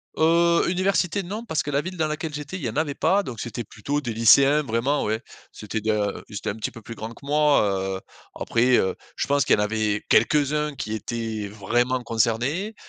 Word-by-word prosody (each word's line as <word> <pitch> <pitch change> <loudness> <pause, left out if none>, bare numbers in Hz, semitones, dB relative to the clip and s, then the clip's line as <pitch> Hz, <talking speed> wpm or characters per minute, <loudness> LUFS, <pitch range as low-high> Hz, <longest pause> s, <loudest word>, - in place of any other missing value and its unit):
Heu, 170 +2 +3
université 185 0 +1
non, 210 +6 -5
parce 160 -9 -1
que 145 - -4
la 140 0 +1
ville 185 +3 -7
dans 160 -2 +1
laquelle 155 0 -4
j'étais, 150 +5 -6
il 175 - -9
y 120 - -1
en - - -7
avait 150 -2 0
pas, 200 +7 +2
donc 125 - -7
c'était 120 +1 -4
plutôt 130 +7 -3
des 120 -6 -4
lycéens 135 +6 +6
vraiment, 135 +2 0
ouais. 110 +2 -1 0.3
C'était 110 +1 -5
de 105 -2 -1
ils 105 - -9
étaient 105 +2 -3
un - - -7
petit 110 - -3
peu 115 - -12
plus 115 - -8
grands 110 0 -6
que 140 - -15
moi, 150 0 +4 0.4
heu, - - -8 0.4
après, 120 +2 +3
heu, 95 - +1 0.2
je - - -1
pense 140 -1 +3
qu'il - - +4
y - - -2
en 105 - +3
avait 105 -1 -1
quelques-uns 150 +5 +2
qui 110 -4 -4
étaient 110 -1 -4
vraiment 120 +5 0
concernés 120 - 0
130 Hz, 220 wpm, -24 LUFS, 110-150 Hz, 0.4 s, lycéens